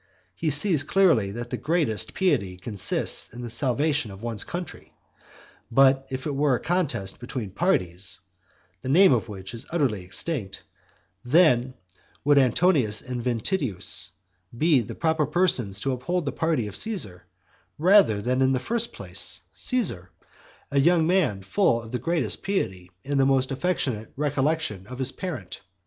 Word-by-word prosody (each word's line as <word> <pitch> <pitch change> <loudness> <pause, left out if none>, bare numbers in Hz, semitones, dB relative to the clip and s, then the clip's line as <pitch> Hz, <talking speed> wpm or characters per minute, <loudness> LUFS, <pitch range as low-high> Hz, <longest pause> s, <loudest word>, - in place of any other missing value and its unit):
He 160 - -2
sees 170 -3 +4
clearly 150 - +3
that 120 +4 -7
the - - -2
greatest 150 -10 -1
piety 100 - 0
consists 95 -1 +1
in 120 +2 -9
the 120 - -6
salvation 135 +2 +1
of 100 +2 -11
one's 115 -3 -4
country. 175 -2 -8 0.7
But 135 +1 +4
if 130 0 -5
it 150 - -2
were 140 -1 +2
a - - -3
contest 155 - -2
between 120 -4 -6
parties, 95 - -1 0.6
the 130 - -5
name 180 +2 +6
of 115 -1 -1
which 95 -2 -8
is 115 - -6
utterly 130 - -1
extinct, 95 - -3 0.6
then 130 -3 +3 0.5
would 145 0 +5
Antonius 130 - +2
and 125 -2 -5
Ventidius 115 - -1 0.5
be 155 0 +4
the 110 - -8
proper 160 -3 0
persons 135 - +1
to 135 - 0
uphold 155 +7 -2
the 140 - -1
party 160 -5 -1
of 105 - -7
Caesar, 170 - -1 0.5
rather 170 - +4
than 125 +3 0
in 130 0 +3
the 130 - 0
first 235 - -1
place, - - -1
Caesar, 190 - +1 0.6
a 140 - +2
young 165 +2 +4
man 160 - +1
full 115 - +1
of 115 -1 -11
the 125 - -2
greatest 165 -9 0
piety 95 - -2 0.2
and 140 0 -1
the 135 - +4
most 135 -1 +1
affectionate 135 -7 -2
recollection 145 - -1
of 125 - -8
his 130 0 +1
parent? 145 - -7
130 Hz, 155 wpm, -25 LUFS, 110-160 Hz, 0.7 s, name